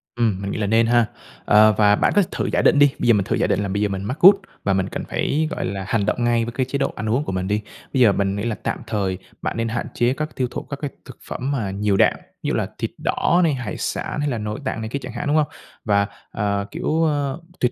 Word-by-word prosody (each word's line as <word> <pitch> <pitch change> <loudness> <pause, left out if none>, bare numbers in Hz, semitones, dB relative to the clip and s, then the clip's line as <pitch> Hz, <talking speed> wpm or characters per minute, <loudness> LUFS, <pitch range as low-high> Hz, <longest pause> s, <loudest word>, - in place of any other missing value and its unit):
Ừm, 110 -5 +1
mình 100 0 -3
nghĩ - - -3
là 105 -2 -1
nên 115 +2 +3
ha. 120 0 +4 0.4
Ờ, 110 +1 +6
và 105 -1 +5
bạn - - +2
có 205 - +6
thử - - -2
giả - - +3
định 145 - +4
đi, 145 -1 +6
bây - - 0
giờ 120 - +7
mình 100 -2 +2
thử - - 0
giả - - +1
định - - +1
là - - -2
bây 100 +2 -1
giờ 105 - +1
mình 95 0 -3
mắc 120 +8 -3
gout 195 +3 +10 0.3
và 100 - +2
mình 95 -1 0
cần - - -4
phải, 155 +2 0
gọi - - -3
là, 95 0 -4
hành 110 -2 +1
động 120 +3 0
ngay 120 -1 +2
với 120 - -5
cái 130 +2 -1
chế 130 +2 -2
độ 140 - -1
ăn 110 0 -3
uống 125 +6 +1
của - - -4
mình 95 0 -2
đi. 105 +1 0 0.3
Bây 135 - +2
giờ 115 -4 +7
mình 100 0 0
nghĩ 100 - -3
là 115 -2 -1
tạm - - -2
thời 95 -3 -1 0.2
bạn - - -3
nên 115 0 0
hạn 120 +1 -3
chế 120 +1 +2
các 155 +2 -5
tiêu 130 -2 0
thụ - - -4
các 140 - -7
cái 145 -2 -3
thực - - -11
phẩm 130 +3 -3
mà 115 -9 -1
nhiều 100 0 0
đạm, - - +5 0.3
ví - - -2
dụ - - 0
là - - 0
thịt - - -3
đỏ 175 - +2
này, 160 -3 +3
hải 125 -7 -4
sản - - -3
hay 145 0 0
là 120 - -1
nội 105 0 -4
tạng 110 - -2
này 110 - -4
kia 140 - -3
chẳng 125 -2 -7
hạn, 120 - -4
đúng 145 - +2
hông? 155 -1 +3 0.4
Và, 100 -2 +2 0.2
à, 100 -2 -1
kiểu, 160 +1 0
a, 145 -3 0 0.3
tuyệt 125 - +2
115 Hz, 300 wpm, -22 LUFS, 100-135 Hz, 0.4 s, gout